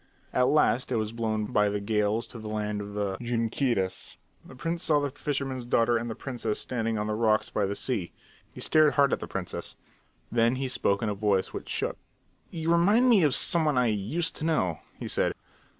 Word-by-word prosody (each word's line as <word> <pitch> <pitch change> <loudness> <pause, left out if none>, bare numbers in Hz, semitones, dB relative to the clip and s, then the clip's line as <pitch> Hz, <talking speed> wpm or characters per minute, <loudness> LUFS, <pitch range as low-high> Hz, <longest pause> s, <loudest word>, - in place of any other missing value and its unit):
At 125 0 +3
last 130 -4 +2
it - - +1
was 110 -1 -1
blown 110 -2 -2
by 105 -3 +2
the 100 0 -2
gales 105 +2 0
to 120 - -9
the 110 -1 -7
land 105 -1 -2
of 100 0 -8
the 100 -2 -2
Junqueiras. 115 -4 -1 0.3
The - - -13
prince 165 +6 -3
saw 155 -4 +3
the 145 -1 -2
fisherman's 135 -2 -3
daughter 120 0 +3
and 120 +1 -2
the 110 - -4
princess 120 -5 -3
standing 115 -3 -2
on 105 - -1
the 105 - -2
rocks 110 0 +1
by 100 -2 0
the 100 - -3
sea. 100 - -3 0.4
He - - -11
stared 155 -1 +4
hard 140 -1 +4
at - - 0
the - - -6
princess. - - -5 0.6
Then 115 +1 +3
he 135 +1 -2
spoke 100 -5 +1
in 110 - 0
a - - -1
voice 100 -2 0
which - - -7
shook. - - -2 0.5
"You 165 0 -2
remind 205 +9 +4
me 220 -6 +6
of 150 -5 +4
some 170 -3 +5
one 150 -4 +1
I 125 -2 +3
used 145 - -1
to - - -6
know," 95 - 0 0.2
he - - -6
said. - - +1
115 Hz, 215 wpm, -27 LUFS, 105-140 Hz, 0.6 s, me